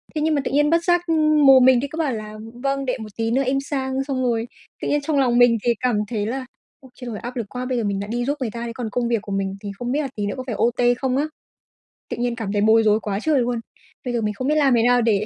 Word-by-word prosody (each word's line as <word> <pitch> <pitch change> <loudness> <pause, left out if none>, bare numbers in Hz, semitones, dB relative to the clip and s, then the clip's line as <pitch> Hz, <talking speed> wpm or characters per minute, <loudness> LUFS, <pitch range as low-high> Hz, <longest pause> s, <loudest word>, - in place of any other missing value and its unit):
Thế 305 - -1
nhưng 315 0 +2
mà 285 - +1
tự - - -2
nhiên 295 +2 +3
bất 335 +1 +2
giác, 350 0 +3
ừm, 305 -2 +3
mồm 265 -2 +8
mình 260 -2 +6
thì 280 - -2
cứ 315 - -9
bảo 305 -6 0
là 215 -1 -7 0.3
"Vâng, 275 0 0
để 255 - -1
một 215 -1 -7
tí 225 0 -1
nữa 270 +3 +2
em 270 +2 +1
sang." 270 -1 -2
Xong 270 -2 -2
rồi 235 -2 0 0.3
tự - - -3
nhiên 290 - +1
trong 290 -1 0
lòng 245 -3 +2
mình 245 -1 +5
thì 240 - +3
cảm 250 -4 +1
thấy 210 -3 -2
là 255 +4 -3 0.4
"Ôi 265 - -15
trời, 240 -4 -6
áp 245 +2 -7
lực 230 - -2
quá, 250 0 -5
bây 250 -1 -1
giờ 230 - 0
mình 200 -1 -1
lại 205 - -6
đi 240 +1 -1
giúp 285 +3 -1
người 235 -4 -2
ta 235 +1 -5
thế 230 - -4
còn 230 -1 -4
công 240 +2 -1
việc 230 -3 0
của 205 - -9
mình 195 0 -2
thì 200 -1 -5
không 245 0 -3
biết 290 +3 +1
là 285 - -2
tí 205 - -2
nữa 205 - -3
có 255 - -4
phải 230 - -3
OT 240 +1 +2
không 260 0 -1
á." 290 - +1 0.8
Tự - - -4
nhiên 240 0 -1
cảm 225 -4 -4
thấy 205 - +1
bối 220 +1 +5
rối 215 0 +3
quá 200 -2 -3
trời 300 +3 +2
luôn, 240 -1 -1 0.5
bây 245 - -2
giờ 235 - 0
mình 210 0 -1
không 255 +6 -4
biết 300 - +2
làm 280 -4 +4
thế 230 - +3
nào 245 0 +4
để 215 -3 +2
245 Hz, 315 wpm, -22 LUFS, 225-275 Hz, 0.8 s, mồm